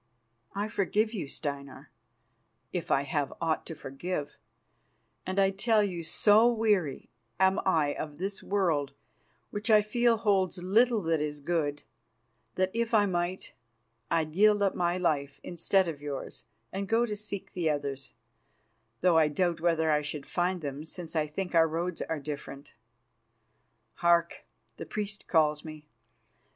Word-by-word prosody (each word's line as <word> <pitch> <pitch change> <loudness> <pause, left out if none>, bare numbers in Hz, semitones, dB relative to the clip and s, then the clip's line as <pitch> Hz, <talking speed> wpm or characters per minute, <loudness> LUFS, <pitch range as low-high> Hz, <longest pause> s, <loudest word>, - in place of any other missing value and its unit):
I 205 +1 -1
forgive 215 +1 0
you, 175 -10 -3
Steinar, 140 -1 -6 0.8
if 175 - -3
I 135 - +3
have 140 0 -1
aught 165 -1 -1
to 165 - -6
forgive, 145 +2 -5 0.9
and 185 +1 -3
I 195 -1 +4
tell 215 +2 +2
you, 180 -4 -2
so 210 +7 +4
weary 210 - 0 0.3
am 190 0 +4
I 155 -5 +3
of 150 -2 -6
this 195 +3 -4
world, 165 -9 0 0.6
which 210 +3 -3
I 215 -1 +6
feel 235 +2 +2
holds 195 -4 +1
little 215 +5 +3
that 165 -2 +1
is 150 -1 -3
good, 145 -2 -1 0.7
that, 185 0 +1
if 230 0 0
I 205 -1 +5
might, 180 -1 -2 0.6
I'd 155 -2 0
yield 205 +2 +4
up 195 - +2
my 175 0 0
life 145 -6 -1
instead 180 +2 +1
of 150 -4 -5
yours, 140 -4 -6 0.3
and 195 +1 -3
go 230 +1 +3
to 210 -3 -3
seek 205 -2 -5
the 175 -4 0
others, 140 -2 -3 0.9
though 175 -2 +5
I 155 - +4
doubt 170 +2 0
whether 165 -2 +2
I 150 0 +3
should 145 -1 -5
find 180 0 -1
them, 145 0 -5
since 165 +1 -7
I 155 -1 +1
think 180 +5 -4
that 170 - +4
our 165 - +5
roads 165 +2 -3
are 160 - -2
different. 140 -1 -7 1.2
Hark! 170 -1 +2 0.3
the - - -6
priests 210 -1 -4
call 155 -3 +3
me. 155 -1 -9
175 Hz, 155 wpm, -29 LUFS, 150-200 Hz, 1.2 s, I